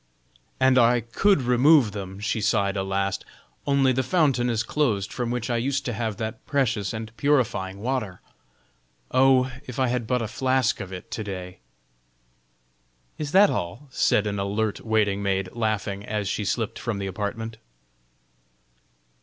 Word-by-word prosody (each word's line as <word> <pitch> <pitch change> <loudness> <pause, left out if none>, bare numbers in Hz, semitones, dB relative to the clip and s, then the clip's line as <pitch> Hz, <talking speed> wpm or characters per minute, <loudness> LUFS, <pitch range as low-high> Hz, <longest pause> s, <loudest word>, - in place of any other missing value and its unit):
"And 130 -1 +5
I 120 0 +4
could 140 - +2
remove 125 0 +5
them," 95 -1 -7
she 110 +1 -1
sighed 100 -2 +1
a 95 - 0
last, 95 0 -1 0.4
"only 140 -2 +4
the 130 - +1
fountain 135 -6 +2
is 115 -2 0
closed 115 -8 0
from 120 -2 -2
which 120 -1 -2
I 120 - +1
used 135 +3 -1
to 120 - -2
have 110 -2 -3
that 110 -1 -5
precious 120 -8 0
and 110 0 -6
purifying 105 -10 0
water. 115 -6 -2 0.9
Oh! 130 0 +4 0.2
if 125 - -7
I 130 -2 +2
had 120 -2 -2
but 125 0 +1
a - - -2
flask 130 +1 +1
of 100 -2 -6
it 90 -2 -9
to 110 - -3
day!" 95 -2 -7 1.6
"Is 150 -2 -3
that 200 +2 +6
all?" 110 +12 -4
said 110 - +2
an 100 -1 -2
alert 100 +2 -1
waiting 105 -3 +1
maid, 95 -2 0
laughing, 105 -3 -2
as 105 -1 -3
she 105 +2 -2
slipped 110 +3 -2
from 115 -4 -3
the 100 - -3
apartment. 105 +4 -4
110 Hz, 160 wpm, -25 LUFS, 100-130 Hz, 1.6 s, that